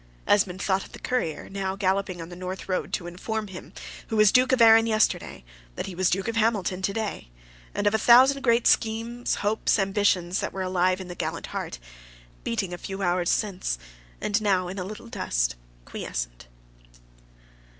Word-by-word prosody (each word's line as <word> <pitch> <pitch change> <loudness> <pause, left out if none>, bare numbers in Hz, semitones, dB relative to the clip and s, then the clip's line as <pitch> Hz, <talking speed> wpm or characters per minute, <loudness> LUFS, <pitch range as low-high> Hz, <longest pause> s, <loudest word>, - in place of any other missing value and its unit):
Esmond 190 -3 +2
thought 195 -1 +1
of - - -14
the - - -9
courier, 205 -12 -2
now 195 -1 -3
galloping 190 -2 0
on 165 - -10
the 175 - -9
North 185 +1 -6
road 185 -1 -2
to 175 - -2
inform 210 +5 -4
him, 185 -1 -10 0.4
who 225 - -3
was 215 -2 +5
Earl 255 +1 +6
of 260 - +3
Arran 225 0 +7
yesterday, 215 - 0 0.3
that - - -4
he 190 - -6
was 180 +1 +1
Duke 195 +3 -1
of 230 - -2
Hamilton 205 -5 +1
to 190 - 0
day, 215 - -4 0.5
and 205 - -1
of 205 - +3
a 220 - +2
thousand 260 +4 +6
great 235 -2 +3
schemes, 230 +2 +1
hopes, 215 +2 +1
ambitions, 195 -2 +1
that - - -3
were 190 - -3
alive 185 0 +1
in 185 - -8
the 175 - -6
gallant - - -4
heart, - - -4 0.7
beating 205 -6 -2
a 175 - -6
few 195 0 -5
hours 175 -1 +1
since, 190 - -1 0.4
and 205 +1 0
now 190 -3 +2
in 190 +2 -5
a - - -2
little 210 +5 -8
dust - - -1 0.3
quiescent. - - -5
195 Hz, 185 wpm, -26 LUFS, 180-220 Hz, 0.7 s, Arran